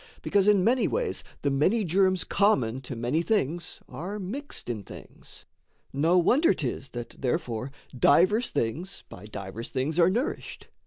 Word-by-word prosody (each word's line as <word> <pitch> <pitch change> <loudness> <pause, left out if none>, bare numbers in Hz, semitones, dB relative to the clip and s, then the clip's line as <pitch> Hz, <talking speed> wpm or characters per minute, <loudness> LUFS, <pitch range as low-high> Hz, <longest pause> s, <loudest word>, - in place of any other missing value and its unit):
Because 200 -1 +2
in 205 -3 +5
many 245 +4 +3
ways 485 0 -2 0.2
the 140 - +1
many 185 +12 +2
germs 185 +1 +2
Common 130 - +1
to 130 0 -7
many 120 +8 0
things 175 -4 -1
are 190 +6 -6
mixed 245 +10 -6
in 115 -4 -3
things, - - -13 0.5
No 160 +6 +3
wonder 250 - +4
'tis 130 -2 -4
that 120 - -6
therefore 125 -1 -2 0.2
divers 185 - +4
things 165 - -3
By - - -11
divers 105 +1 -7
things 145 +6 -1
are 170 +1 +6
nourished. 235 +8 -3
170 Hz, 150 wpm, -27 LUFS, 130-200 Hz, 0.5 s, are